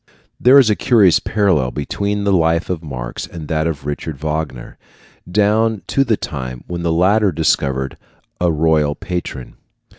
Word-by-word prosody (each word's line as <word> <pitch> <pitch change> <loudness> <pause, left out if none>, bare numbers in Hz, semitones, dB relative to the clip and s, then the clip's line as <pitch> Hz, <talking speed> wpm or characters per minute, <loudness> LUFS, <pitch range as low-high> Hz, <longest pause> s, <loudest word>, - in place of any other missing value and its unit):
There 130 +3 +6
is 125 -6 +5
a - - +2
curious 100 -9 +4
parallel 95 -12 +1
between 100 +9 -3
the 100 -1 +2
life 85 0 +1
of 85 -3 -3
Marx 65 -6 -6
and 80 -3 -9
that 80 0 0
of 75 -4 -4
Richard 75 +1 -4
Wagner 75 -4 -4 0.5
down 105 +2 +2
to 135 - +2
the 115 -5 +1
time 65 -3 -6
when 85 -1 -5
the 85 -1 0
latter 95 +5 +3
discovered 70 -4 0 0.4
a 90 -1 +2
royal 75 -2 +1
patron. 90 -9 -6
85 Hz, 155 wpm, -18 LUFS, 75-100 Hz, 0.5 s, There